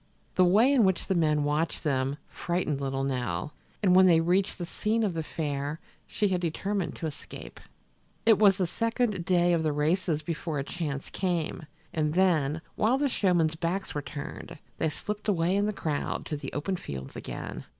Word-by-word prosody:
The 185 - +4
way 215 +10 +5
in 255 -5 +5
which 190 -3 +2
the - - 0
men 155 -4 +2
watched 150 +4 0
them 135 -2 0
frightened 170 -5 -2
little 135 0 -1
Nell, 125 -4 -2 0.3
and 180 -2 +5
when 185 0 +8
they 165 -2 +6
reached 180 +4 +1
the 175 - -4
scene 220 +6 0
of 200 -4 0
the 165 - -2
fair 150 -1 -3 0.3
she 205 - 0
had 180 -2 0
determined 190 +3 -2
to - - -5
escape. 155 -2 -8 0.7
It 225 -3 +6
was 200 -3 +6
the 185 - +1
second 225 -1 -1
day 175 -1 +3
of 165 - +2
the 155 -1 +1
races 155 +1 0
before 160 -1 -3
a 135 - -1
chance 145 -3 -4
came, 170 -4 -2 0.3
and 155 0 0
then, 160 -5 +2
while 230 +5 +2
the 285 0 +1
showmen's 175 -8 +2
backs 175 +4 -2
were 145 - -2
turned, 145 +2 -7 0.2
they 160 - +2
slipped 210 +7 -5
away 180 -2 +2
in 205 +1 +2
the - - +1
crowd 155 -7 -2
to 155 - -3
the 145 - -6
open 185 +6 -2
fields 65 - -7
again. - - -6
170 Hz, 190 wpm, -28 LUFS, 150-190 Hz, 0.7 s, when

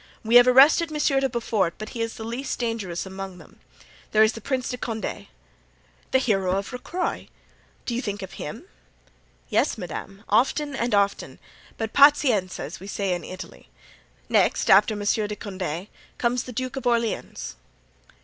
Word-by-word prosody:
We 230 +2 +6
have 245 0 +7
arrested 280 +6 +6
Monsieur 295 -3 +1
de 270 0 +1
Beaufort, 220 -7 0
but 215 0 -7
he 230 - -5
is 230 0 -2
the 220 - -7
least 240 +4 -4
dangerous 225 -8 -3
among 190 -1 -7
them. - - -17 0.5
There 215 0 +6
is 220 - +3
the 225 - -8
Prince 255 +2 -2
de 250 - -3
Condé——" 225 -3 -4 0.8
"The - - +4
hero 195 -7 +1
of 195 +4 -4
Rocroy. 345 +9 -3 0.6
Do 240 - -2
you 240 - -1
think 205 -4 -4
of 190 - -8
him?" 185 - -7 0.9
"Yes, - - +1
madame, 195 +1 -7
often 270 +6 +2
and 235 -3 0
often, 200 0 0 0.4
but 225 -1 -4
pazienza, 275 -10 +4
as 145 +5 -7
we 195 - -10
say 195 -2 -1
in 175 - -4
Italy; 185 0 -10 0.6
next, - - +2
after 215 - +6
Monsieur 210 +1 0
de 210 - -4
Condé, 185 -4 -5 0.3
comes 240 0 0
the 250 - -7
Duke 255 +3 -4
of 265 - -3
Orleans." 235 -2 -1
225 Hz, 170 wpm, -25 LUFS, 195-250 Hz, 0.9 s, have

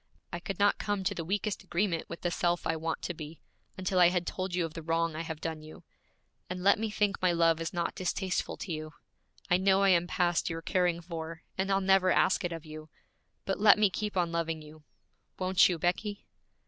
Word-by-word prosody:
I 175 - -3
could 195 +1 -5
not 205 0 +3
come 205 -2 -1
to 195 +2 0
the 170 - -4
weakest 195 +4 -2
agreement 180 -2 -1
with - - -7
the 175 - -1
self 175 0 0
I 160 - +1
want 160 0 -3
to 175 - -2
be, 155 0 -9 0.4
until 185 0 0
I 175 - +8
had 180 -1 -1
told 185 0 -3
you 175 -2 +1
of 160 - -7
the 165 - -6
wrong 165 0 0
I 160 - -3
have 160 -2 -5
done 160 -1 -4
you. 155 0 -12 0.7
And 180 0 -5
let 200 +1 +5
me 220 0 -1
think 210 -1 0
my 185 -1 +3
love 165 -1 +3
is 165 - -3
not 170 -2 -2
distasteful 185 +1 -2
to 185 - -6
you. 155 -1 -5 0.6
I 175 - +6
know 190 +1 +3
I 195 - +5
am 175 -1 +4
past 175 -2 +1
your 165 0 -5
caring 175 -2 +1
for, 165 -1 -7
and 190 +1 -1
I'll 195 0 +2
never 190 -1 +4
ask 190 - +3
it 175 - -2
of 165 -1 -6
you, 155 0 -10 0.6
but 195 - -2
let 205 0 +7
me 210 -2 +3
keep 210 0 -3
on 175 -2 +1
loving 165 -2 -2
you. 155 +1 -14 0.6
Won't 185 0 +4
you, 175 - -1
Becky?' 200 +5 -2
175 Hz, 225 wpm, -30 LUFS, 165-190 Hz, 0.7 s, I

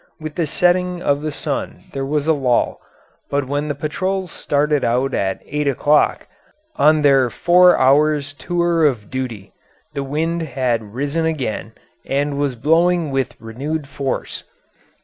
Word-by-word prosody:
With 155 -1 -6
the 165 0 -1
setting 180 +2 +1
of 145 -4 0
the 155 - -2
sun - - -4
there 135 0 -3
was 150 0 0
a 160 - +4
lull, 130 -5 0 0.5
but 140 -1 0
when 145 +2 -2
the 145 - -2
patrols 185 +5 -2
started 145 0 0
out 125 +3 +1
at 95 -1 -1
eight 150 0 -2
o'clock, 145 +2 +2 0.5
on 155 - +4
their 135 -3 +4
four 180 +7 +5
hours' 145 +1 +3
tour 170 +4 0
of 120 -9 0
duty, 125 -7 -5 0.4
the 140 - -3
wind 160 +5 -1
had 120 -7 -2
risen 145 +5 -1
again 130 -8 -3 0.3
and 140 +1 -1
was 140 -3 0
blowing 165 +4 +2
with 135 -2 -2
renewed 140 +7 -4
force. 140 -2 -4
145 Hz, 150 wpm, -19 LUFS, 135-160 Hz, 0.5 s, four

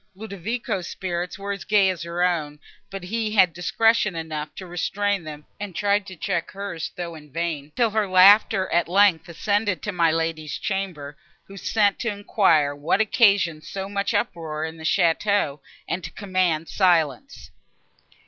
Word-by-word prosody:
Ludovico's 200 -1 -4
spirits 175 -1 -4
were 200 0 -5
as 200 - -5
gay 210 -2 +3
as 180 - -7
her 170 +1 -2
own, 155 -5 0 0.3
but 195 -1 -7
he 215 +3 -2
had 185 -4 +5
discretion 210 +3 +2
enough 155 -2 -4
to 190 - -8
restrain 195 +2 -1
them, 150 -1 -9
and 200 -4 -6
tried 205 0 +1
to 185 - -9
check 175 -1 -2
hers, 195 -5 -5
though 170 -1 -5
in 150 -2 -13
vain, 155 -3 -3
till 235 -3 +2
her 215 -1 0
laughter, 190 +1 +6
at 170 -1 +2
length, 180 -3 +3
ascended 205 +3 -1
to 210 - -2
my 170 -3 +2
Lady's 160 -1 -2
chamber, 180 -8 -4 0.3
who 195 - -14
sent 205 +1 +1
to 230 - -1
enquire 180 -8 +2
what 150 +7 0
occasioned 200 -8 +3
so 195 0 -5
much 200 0 -2
uproar 160 -6 -2
in 160 0 -7
the 160 - -11
château, 170 -2 +1 0.3
and 180 - -3
to 165 - -5
command 185 -5 -1
silence. 180 - 0
185 Hz, 165 wpm, -23 LUFS, 165-200 Hz, 0.3 s, laughter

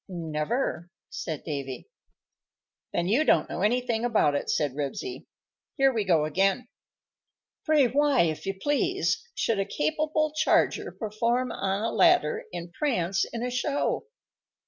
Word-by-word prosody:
"Never," 170 - -2 0.2
said 155 -3 -5
Davy. 135 -5 -5 1.0
"Then 170 0 -1
you 240 +10 +3
don't 160 - +3
know - - -5
anything 235 +1 +1
about 220 -11 +2
it," 145 - -2
said 145 -4 0
Ribsy. 145 - -5 0.5
"Here 270 -1 +4
we 220 -3 0
go 165 -5 +3
again:" 195 +9 +1 1.0
_Pray 285 -6 +4
why, 290 -2 +4
if 160 +2 -1
you 195 - -1
please, 365 - 0
should 225 -3 0
a - - +2
capable 305 - -1
charger 315 +1 +2
Perform 235 +3 -1
on 195 +2 -2
a 230 - 0
ladder 360 +7 +3
and 170 +1 -7
prance 195 - 0
in 235 0 -5
a 250 - -2
show? 285 - -1
225 Hz, 140 wpm, -27 LUFS, 170-280 Hz, 1.0 s, Here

